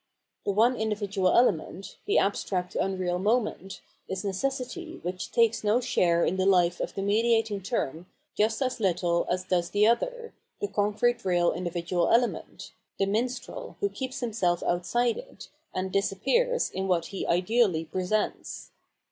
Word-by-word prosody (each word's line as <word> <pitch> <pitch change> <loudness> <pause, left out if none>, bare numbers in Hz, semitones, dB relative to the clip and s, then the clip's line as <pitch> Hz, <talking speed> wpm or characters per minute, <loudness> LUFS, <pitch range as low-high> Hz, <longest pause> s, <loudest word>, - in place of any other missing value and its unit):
The - - +3
one 230 +5 +3
individual 205 -3 0
element, 195 -4 +1
the - - +3
abstract 185 -2 0
unreal 185 -2 -1
moment, 210 -2 -1 0.3
is 190 +2 -4
necessity 265 - -3
which 180 +1 -4
takes 230 -1 +2
no 215 +3 +3
share 170 -8 +2
in 190 - 0
the 185 - +1
life 180 -2 +3
of - - -4
the 195 - -2
mediating 225 0 +2
term 180 - -3 0.3
just 220 +5 +1
as 255 -1 -2
little 175 -3 +1
as 180 +1 0
does 180 -2 0
the 205 +1 +3
other, 470 - 0 0.3
the 410 - -1
concrete 215 - +1
real 175 -2 +2
individual 175 0 -1
element, 240 +1 0 0.2
the 195 - +2
minstrel, 235 +5 -3
who 405 - +1
keeps 260 -5 -5
himseM 210 -7 0
outside 225 +8 +1
it, - - -12 0.2
and 185 0 -3
disappears 475 - +1
in 190 +1 -3
what 175 -3 +1
he 195 - -3
ideally 180 -2 +2
presents. 185 +5 -2
200 Hz, 150 wpm, -27 LUFS, 180-235 Hz, 0.3 s, The